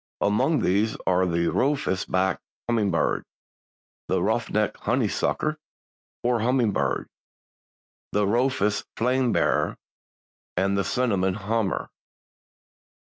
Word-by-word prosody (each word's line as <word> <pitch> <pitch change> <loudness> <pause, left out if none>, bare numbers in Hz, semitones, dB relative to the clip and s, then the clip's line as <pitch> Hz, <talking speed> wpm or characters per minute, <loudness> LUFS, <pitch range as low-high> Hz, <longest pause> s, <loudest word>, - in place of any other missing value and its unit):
Among 105 +9 +2
these 105 +4 +1
are 95 0 +3
the 85 0 +1
"Rufous 135 -9 0
backed 95 0 0 0.3
Hummingbird," 105 -7 +1 0.8
the - - +1
"Ruff - - 0
necked - - 0
Honeysucker, 155 0 0 0.7
or 120 -1 +2
Hummingbird," 110 - +1 1.0
the 105 0 +2
"Rufous 110 -1 +1
Flame 125 +1 +2
bearer" - - +1 0.8
and 100 +2 +2
the 100 - +1
"Cinnamon 95 -4 +1
Hummer." 110 -1 -1
105 Hz, 95 wpm, -25 LUFS, 95-125 Hz, 1.0 s, are